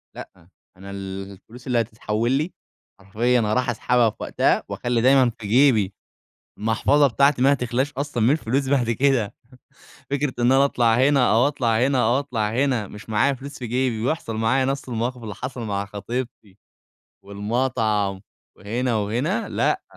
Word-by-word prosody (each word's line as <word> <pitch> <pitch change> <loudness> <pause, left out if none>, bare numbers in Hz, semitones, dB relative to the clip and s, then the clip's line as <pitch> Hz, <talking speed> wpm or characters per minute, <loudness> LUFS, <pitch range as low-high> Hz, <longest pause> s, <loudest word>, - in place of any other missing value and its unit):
لأ، 85 - -12 0.3
أنا 100 +1 -10
الفلوس 100 +5 -9
اللي 120 -2 +2
هتتحول 110 +1 -2
لي، 155 +6 0 0.5
حرفيًا 115 +6 0
هاروح 120 +4 0
أسحبها 120 0 +2
في - - -12
وقتها - - +1
وأخلي 120 -1 -1
دايمًا 130 0 +5
في 105 - -6
جيبي، 110 -4 +3 0.7
المحفظة 115 +7 +3
بتاعتي 140 +1 +2
ما 140 - +5
هتخلاش 130 +1 -1
أصلًا 140 -4 -2
من 115 - +4
الفلوس 135 -2 0
بعد 130 -4 +1
كده. 125 -3 +1 0.8
فكرة 140 -1 -1
إن 120 +2 +3
أنا 135 +1 +5
أطلع 120 -5 +2
هنا 130 0 +3
أو 120 +4 +4
أطلع 120 -6 0
هنا 130 -4 +2
أو 120 +3 +2
أطلع 120 -7 -2
هنا 125 -3 0
مش 105 +1 -12
معايا 110 +6 +2
فلوس 140 +2 -10
في 125 - -5
جيبي 120 -1 -1
ويحصل 125 -5 -2
معايا 120 +4 +1
نفس 135 0 -3
المواقف 120 +1 -3
اللي 105 -2 -6
حصل 125 +4 -6
مع 100 -3 -2
خطيبتي 105 0 -6 0.7
والمطعم 105 -1 -1 0.4
وهنا 120 +3 -2
وهنا، 125 - -1
لأ. - - 0
120 Hz, 155 wpm, -23 LUFS, 110-135 Hz, 0.8 s, دايمًا